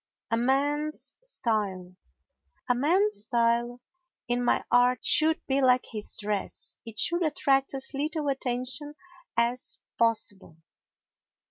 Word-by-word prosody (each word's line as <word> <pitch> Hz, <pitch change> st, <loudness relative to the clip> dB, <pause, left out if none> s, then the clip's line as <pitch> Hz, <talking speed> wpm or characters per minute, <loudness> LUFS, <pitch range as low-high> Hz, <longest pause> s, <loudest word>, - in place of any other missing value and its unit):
A -, -, +4 dB
Man's 290 Hz, +5 st, 0 dB
Style 205 Hz, -, -2 dB, 0.7 s
A -, -, +4 dB
man's 340 Hz, -, +2 dB
style 235 Hz, +1 st, +1 dB, 0.5 s
in 245 Hz, 0 st, +1 dB
any -, -, +2 dB
art 245 Hz, 0 st, +3 dB
should 315 Hz, +1 st, +3 dB
be 270 Hz, 0 st, +1 dB
like 255 Hz, -1 st, +4 dB
his 215 Hz, -2 st, -5 dB
dress—it 210 Hz, +2 st, -4 dB
should 345 Hz, +10 st, +1 dB
attract 275 Hz, -3 st, +1 dB
as 270 Hz, +1 st, -1 dB
little 300 Hz, +2 st, -2 dB
attention 270 Hz, +2 st, -2 dB, 0.4 s
as 240 Hz, +2 st, 0 dB, 0.2 s
possible. 210 Hz, -7 st, 0 dB
250 Hz, 110 wpm, -27 LUFS, 230-290 Hz, 0.7 s, A